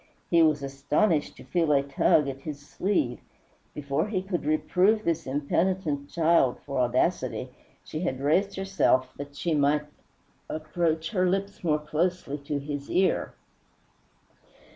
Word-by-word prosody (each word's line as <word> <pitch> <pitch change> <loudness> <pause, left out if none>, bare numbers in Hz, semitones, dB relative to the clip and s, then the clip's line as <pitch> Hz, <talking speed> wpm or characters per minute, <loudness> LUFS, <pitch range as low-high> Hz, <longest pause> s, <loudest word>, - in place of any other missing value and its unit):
He 170 -1 +6
was 155 -3 +3
astonished 145 +5 0
to - - -11
feel 165 -3 +1
a 140 -1 +4
tug 140 +1 +3
at 135 0 -5
his 150 -2 -6
sleeve. 145 -4 -1 0.6
Before 145 +4 -1
he 190 -4 -2
could 190 -5 -3
reprove 185 +7 +2
this 165 -4 -1
impenitent 145 +1 -1
child 165 -6 +3
for 140 -2 -2
audacity 125 +1 0 0.3
she 155 - -6
had 145 -7 -2
raised 180 +8 +1
herself 160 -9 +1
that 145 0 -8
she 170 +3 -1
might 150 0 +2 0.6
approach 160 +1 -1
her 185 -4 +2
lips 200 +2 -2
more 155 -3 +2
closely 155 0 -2
to 145 +1 -3
his 145 0 -5
ear. 185 +1 +1
155 Hz, 140 wpm, -27 LUFS, 140-180 Hz, 0.6 s, He